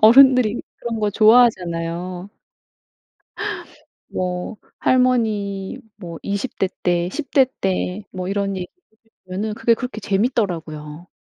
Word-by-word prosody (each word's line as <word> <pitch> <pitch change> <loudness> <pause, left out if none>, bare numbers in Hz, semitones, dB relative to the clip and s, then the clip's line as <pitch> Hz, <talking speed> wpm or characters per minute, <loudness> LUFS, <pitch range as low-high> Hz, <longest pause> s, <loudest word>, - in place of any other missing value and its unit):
어른들이 250 0 +7 0.2
그런 230 -2 -3
거 210 -1 +1
좋아하잖아요. 185 -5 +3 1.8
뭐 180 +3 -3 0.2
할머니 220 -5 +1 0.2
뭐 170 -5 -8
20 200 +5 -3
대 190 - +2
때 175 0 +1
10 275 - -5
대 265 -2 +6
때 190 +1 -1
뭐 185 0 -4
이런 200 -1 -1
얘기 180 -1 -4
해 360 -11 -40 0.3
주시면은 205 +4 -3
그게 230 +1 +3
그렇게 250 -2 -5
재밌더라고요. 175 - -1
200 Hz, 230 characters per minute, -21 LUFS, 180-230 Hz, 1.8 s, 어른들이